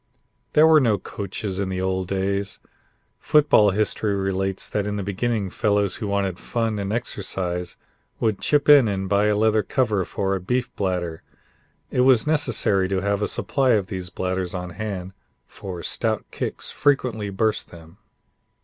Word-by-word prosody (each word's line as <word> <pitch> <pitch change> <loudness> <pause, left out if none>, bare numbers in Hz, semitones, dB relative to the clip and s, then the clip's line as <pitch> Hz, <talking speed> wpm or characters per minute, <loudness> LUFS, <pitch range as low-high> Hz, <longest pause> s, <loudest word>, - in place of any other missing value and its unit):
There 155 - +6
were 160 -1 +7
no 115 -7 +2
coaches 100 0 -5
in 100 -1 -1
the 95 -1 -3
old 95 0 -1
days. 100 +1 -2 0.6
Football 145 -9 +4
history 105 +1 0
relates 95 0 -2
that 105 -1 -2
in 105 - -2
the 100 - -3
beginning 100 0 -2
fellows 100 -2 +1
who 105 - -4
wanted 100 -2 -1
fun 115 -3 -2
and 100 0 -3
exercise 90 -5 -3 0.4
would 110 -4 0
chip 145 -1 +2
in 145 -5 +8
and 95 -2 -2
buy 100 +1 +2
a 105 - +2
leather 110 +1 +3
cover 105 -3 0
for 95 +2 -2
a 95 - -4
beef 125 +6 -2
bladder. 90 -4 -2 0.7
It 125 - +2
was 130 -2 +5
necessary 120 -11 +1
to 95 -1 0
have 100 +1 0
a 105 - +1
supply 135 -3 +1
of 105 -4 +2
these 95 -2 -6
bladders 95 -1 -3
on 90 -1 -5
hand, 95 -1 -5 0.3
for 90 -3 -8
stout 110 -2 -1
kicks - - -3
frequently 125 -7 0
burst 110 +3 -1
them. 85 +1 -15
100 Hz, 165 wpm, -23 LUFS, 95-110 Hz, 0.7 s, in